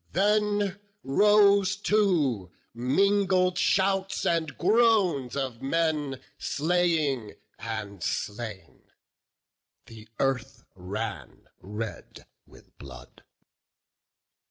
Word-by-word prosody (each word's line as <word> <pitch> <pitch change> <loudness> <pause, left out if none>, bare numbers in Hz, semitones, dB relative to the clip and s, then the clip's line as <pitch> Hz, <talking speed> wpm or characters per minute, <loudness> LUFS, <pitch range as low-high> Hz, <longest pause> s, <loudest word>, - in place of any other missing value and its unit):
Then 205 0 +1 0.2
rose 200 +5 +4
too 170 - +1 0.2
mingled 185 - +2
shouts 195 0 +1
and 165 -3 0
groans 190 - +2
of 130 -4 -4
men 150 -2 -1 0.2
Slaying 155 -8 0 0.2
and 110 -4 -6
slain; 105 +2 -5 1.0
the 110 -1 -14
earth 135 0 -2
ran 100 +5 -6 0.2
red 105 +3 -7 0.2
with - - -20
blood. 65 -3 -13
155 Hz, 75 wpm, -27 LUFS, -, 1.0 s, rose